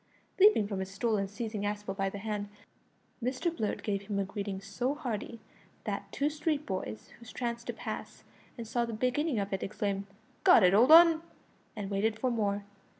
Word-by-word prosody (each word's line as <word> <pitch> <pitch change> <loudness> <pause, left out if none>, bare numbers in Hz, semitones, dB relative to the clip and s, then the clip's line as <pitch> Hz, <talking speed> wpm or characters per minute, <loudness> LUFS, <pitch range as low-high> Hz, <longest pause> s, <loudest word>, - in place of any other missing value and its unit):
Leaping 380 - +6
from 200 -2 -3
his 190 0 -4
stool 215 +3 0
and 195 -1 -1
seizing 215 0 -4
Aspel 205 -1 -3
by 195 -1 0
the 200 - -7
hand, 205 0 -3 0.7
Mr 260 +7 -1
Blurt 215 -6 -2
gave 200 -2 -1
him 205 -2 -2
a 200 - +2
greeting 200 0 -4
so 220 +8 -2
hearty 235 -5 -4 0.4
that - - -4
two 285 - 0
street 300 0 -1
boys 110 - -5
who 235 - -13
chanced 235 -1 -4
to - - -2
pass - - -7 0.3
and 230 -2 -6
saw 240 +2 0
the 230 -1 -4
beginning 255 +5 0
of 200 -1 -2
it 190 - -1
exclaimed, 200 -1 -2 0.4
"Go - - +8
it, 185 -4 +6
old 235 +8 +6
'un!" 330 -1 +9 0.5
and 205 -2 -5
waited 215 +2 +1
for 255 +2 0
more. 205 -3 -1
215 Hz, 190 wpm, -31 LUFS, 200-250 Hz, 0.7 s, un